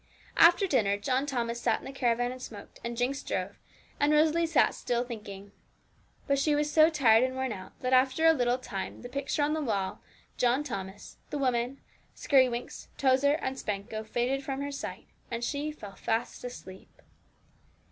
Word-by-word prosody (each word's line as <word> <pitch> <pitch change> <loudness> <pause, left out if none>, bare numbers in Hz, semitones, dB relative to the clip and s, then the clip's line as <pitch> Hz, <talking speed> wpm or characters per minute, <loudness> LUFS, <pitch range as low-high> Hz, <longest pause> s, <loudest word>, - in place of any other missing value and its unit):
After 350 +4 +7
dinner 210 - +2
John 260 +6 0
Thomas 235 -3 -2
sat 225 -2 +2
in - - -13
the 270 - -6
caravan 245 -2 0
and 255 0 -9
smoked, 210 -5 -10
and 235 0 -4
Jinx 260 +3 0
drove, - - -4 0.4
and 290 +1 +3
Rosalie 315 +2 +3
sat 320 -3 +3
still 240 -1 -1
thinking. 205 -5 -8 0.7
But 280 -1 +1
she 295 +1 +2
was 295 0 0
so 310 +1 +6
tired 245 -7 +5
and 260 0 -1
worn 260 -1 -2
out, 190 -3 -9
that 255 0 0
after 260 +5 +3
a 325 - +8
little 245 -4 +1
time 205 -5 -6
the 245 - -7
picture 280 +2 -1
on 295 +1 +1
the 315 - -1
wall, 200 -8 -2 0.4
John 250 +4 +2
Thomas, 195 -6 -7
the 295 - -3
woman, 255 -1 0 0.3
Skirrywinks, 255 -4 +1
Tozer, 270 +1 +3
and 265 -4 -3
Spanco 210 0 -4
faded 245 +5 -1
from 270 0 -3
her 285 0 -3
sight, 275 - -6 0.2
and 235 0 -4
she 290 +4 -2
fell 205 -10 -10
fast 225 +4 -2
asleep. 190 -6 -9
255 Hz, 175 wpm, -29 LUFS, 235-285 Hz, 0.7 s, a